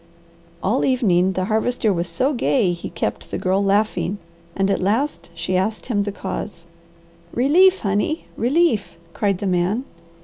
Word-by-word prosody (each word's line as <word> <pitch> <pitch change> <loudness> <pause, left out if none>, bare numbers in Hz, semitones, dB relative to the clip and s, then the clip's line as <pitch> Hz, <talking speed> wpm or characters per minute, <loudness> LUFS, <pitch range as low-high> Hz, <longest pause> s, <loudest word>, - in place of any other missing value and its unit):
All - - +1
evening 190 -8 +2
the 185 0 -1
Harvester 220 +1 +1
was 170 -1 -2
so 255 - 0
gay 240 -6 +2
he 170 - -6
kept 170 - -4
the - - -3
Girl 190 +2 +1
laughing 200 -2 +1 0.4
and 195 0 +1
at 195 - 0
last 225 +5 -1
she 185 +2 -2
asked 205 +4 -1
him 215 -5 0
the 205 0 -2
cause. 170 -3 -6 0.7
"Relief, 355 +10 +4
honey! 205 +10 -1
Relief!" 265 - +1 0.2
cried 200 -3 0
the 200 - -5
man. 185 +6 +1
205 Hz, 150 wpm, -21 LUFS, 185-245 Hz, 0.7 s, Relief